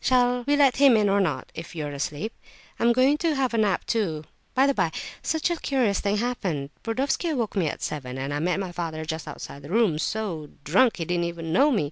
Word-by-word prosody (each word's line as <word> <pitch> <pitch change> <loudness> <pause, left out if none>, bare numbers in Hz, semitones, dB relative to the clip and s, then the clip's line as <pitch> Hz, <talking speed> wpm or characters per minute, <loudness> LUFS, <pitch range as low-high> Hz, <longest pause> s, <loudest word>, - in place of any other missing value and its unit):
Shall 245 -1 +3
we 290 - +4
let 280 -3 +4
him 270 -4 +6
in 210 -2 +3
or 200 +1 +3
not, 170 -6 -2
if 165 +1 -8
you 155 -2 -3
are 145 - -4
asleep? 150 +8 -3 0.5
I'm 235 - +4
going 260 +5 +3
to 325 -3 +1
have 265 -3 0
a - - +1
nap, 205 -4 +1
too. 175 -10 -1 0.3
By 265 +1 +5
the 280 - +3
by, 170 -10 +1 0.3
such 320 +2 0
a 340 - 0
curious 255 -10 +1
thing 205 0 0
happened. 185 - -2
Burdovsky 275 +8 -1
woke 230 -3 -2
me 185 -5 +2
at - - -4
seven, 130 -4 -4
and 135 +2 -3
I 145 - -1
met 180 +4 0
my 190 -2 -3
father 165 -3 -4
just 160 0 -4
outside 140 - -8
the 145 - -11
room, 200 -6 +2
so 170 -6 -3
drunk, 205 - +3
he 165 - -3
didn't 175 0 0
even 165 -1 -4
know 280 - +5
me. 245 -8 +2
200 Hz, 235 wpm, -25 LUFS, 160-250 Hz, 0.5 s, him